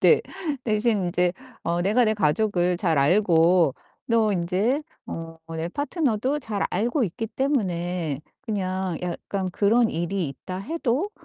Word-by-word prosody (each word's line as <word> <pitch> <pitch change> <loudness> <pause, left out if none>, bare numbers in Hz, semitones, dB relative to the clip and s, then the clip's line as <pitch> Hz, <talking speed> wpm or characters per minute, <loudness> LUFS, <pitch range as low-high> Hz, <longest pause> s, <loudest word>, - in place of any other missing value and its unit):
네. - - +6 0.4
대신 215 -3 +2
인제 175 0 +1 0.3
어 170 +1 0
내가 220 +6 +3
내 215 0 +2
가족을 180 -1 +2
잘 170 -5 +1
알고 170 -1 +4 0.3
또 220 -2 +3
인제 195 - +1 0.2
어 165 0 -7
내 165 +1 -3
파트너도 285 - 0
잘 215 -6 -2
알고 235 - +1
있기 220 +5 -4
때문에 180 - -1 0.2
그냥 190 -6 -2
약간 185 +2 -3
그런 225 +5 +3
일이 175 0 -2
있다 185 +7 -7
해도 295 - -1
195 Hz, 235 characters per minute, -25 LUFS, 175-225 Hz, 0.4 s, 네